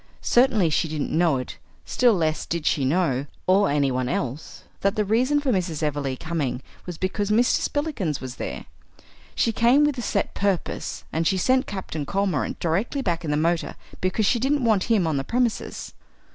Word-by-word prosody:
Certainly 230 -9 +3
she 165 - +1
didn't 155 -1 -3
know 165 -4 +3
it; 125 - -7 0.3
still 245 -3 +3
less 160 -3 -1
did 165 -2 -3
she 140 - +2
know, 140 -3 +1 0.2
or 195 +2 +4
anyone 135 -3 +1
else, 135 +3 -4 0.2
that 200 0 +1
the 210 - +1
reason 250 +8 +2
of 290 - -1
Mrs. 180 - -1
Everleigh's 140 -3 -1
coming 150 -6 -2 0.2
was 175 -2 -5
because 195 +3 -2
Mr. 235 +4 +3
Spillikins 280 - -2
was 130 -1 -7
there. - - -5 0.7
She 230 - +2
came 240 +6 +4
with 295 -3 +1
a - - -2
set 225 - -1
purpose, 200 -3 -2
and 160 +1 +1
she 190 - +2
sent 260 +8 +2
Captain 160 -7 -5
Cormorant 195 -1 -1
directly 200 - -1
back 175 -4 -1
in 160 - -3
the 150 - +1
motor 165 +2 0 0.2
because 185 +4 0
she 235 - +2
didn't 270 +1 +1
want 215 -5 +3
him 220 -7 +2
on 155 -3 0
the 135 - -1
premises. 240 - -2
185 Hz, 185 wpm, -24 LUFS, 155-230 Hz, 0.7 s, or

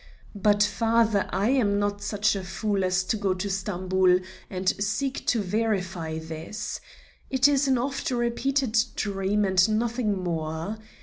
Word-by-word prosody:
But, 205 0 +3
father, 220 0 +2
I 205 +4 0
am 210 -7 +2
not 205 0 -1
such 205 0 +1
a 195 - -4
fool 195 +1 -1
as 185 0 +1
to 220 - -1
go 195 -2 0
to 185 +2 -3
Stamboul 185 -1 +2 0.3
and 185 -1 -5 0.2
seek 260 +7 -2
to 235 - +3
verify 185 -5 -1
this. 160 +6 -6 0.5
It 265 +1 +4
is 285 -1 +2
an 260 -1 +3
oft 270 +3 -2
repeated 245 +1 0 0.2
dream 200 0 0
and 190 +1 +4
nothing 225 -4 -1
more. 165 +4 -3
205 Hz, 145 wpm, -26 LUFS, 185-230 Hz, 0.5 s, It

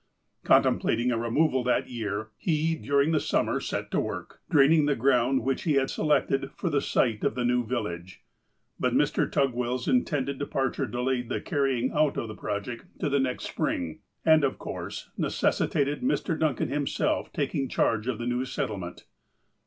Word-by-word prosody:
Con - - +6
templating 120 +2 +1
a 115 - 0
removal 130 +3 +1
that 125 - +1
year, 110 -3 -4
he, 160 - 0
during 145 -1 +1
the 155 - +3
summer, - - 0
set - - -4
to - - +1
work, - - -5
draining 150 +1 +5
the 145 - +2
ground 130 0 +2
which 135 +1 0
he 155 - +1
had 135 -1 +2
selected 135 -3 +1
for 175 - -2
the 140 -1 +2
site 115 -4 +1
of - - +1
the 125 -1 -1
new 125 0 +2
village, 95 - -4 0.6
but - - +1
Mr. - - +2
Tugwell's 125 -2 0
intended 140 - 0
departure 135 -2 -1
delayed 125 0 -1
the - - -1
carrying 135 -5 0
out 150 -1 +2
of 115 - -2
the - - -5
project 105 - -5
to 155 - 0
the 140 0 +2
next 130 -1 -1
spring, 85 -3 -2 0.3
and 160 -2 +6
of 135 - +1
course - - -6
necessitated 145 +1 0
Mr. 250 - 0
Duncan 155 -5 0
him 145 -1 -1
self - - -1
taking 135 -2 -1
charge 115 0 +1
of 130 -4 -1
the 120 - -4
new 125 +1 0
settlement. 100 -9 -4
130 Hz, 175 wpm, -27 LUFS, 120-145 Hz, 0.6 s, Con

